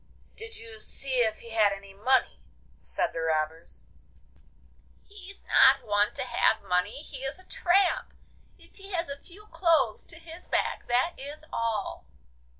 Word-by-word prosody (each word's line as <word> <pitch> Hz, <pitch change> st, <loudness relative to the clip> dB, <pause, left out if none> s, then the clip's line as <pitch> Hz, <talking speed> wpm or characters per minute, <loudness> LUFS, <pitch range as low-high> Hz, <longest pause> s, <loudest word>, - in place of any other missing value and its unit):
'Did 450 Hz, 0 st, -8 dB
you 450 Hz, -1 st, -11 dB
see 270 Hz, -9 st, -3 dB
if 220 Hz, -2 st, +1 dB
he 230 Hz, -, -10 dB
had 215 Hz, -2 st, +4 dB
any 195 Hz, 0 st, -8 dB
money?' 245 Hz, -, +1 dB, 0.4 s
said 60 Hz, -, -2 dB
the 165 Hz, -, -3 dB
robbers. 160 Hz, 0 st, -2 dB, 1.2 s
'He's 395 Hz, -1 st, -11 dB
not 270 Hz, 0 st, +6 dB
one 205 Hz, -1 st, +2 dB
to -, -, -2 dB
have 255 Hz, -, +2 dB
money, 200 Hz, +9 st, 0 dB
he 275 Hz, -, -7 dB
is 270 Hz, +4 st, -2 dB
a 370 Hz, -, -15 dB
tramp! 385 Hz, +6 st, +2 dB, 0.5 s
If -, -, -18 dB
he 390 Hz, 0 st, -9 dB
has 340 Hz, -3 st, -1 dB
a 280 Hz, 0 st, -5 dB
few 400 Hz, +4 st, -14 dB
clothes 325 Hz, -, +2 dB
to 335 Hz, -, -11 dB
his 330 Hz, +2 st, -10 dB
back, -, -, -1 dB
that 250 Hz, +8 st, +2 dB
is 290 Hz, +3 st, -7 dB
all. 225 Hz, -, -2 dB
270 Hz, 155 wpm, -28 LUFS, -, 1.2 s, not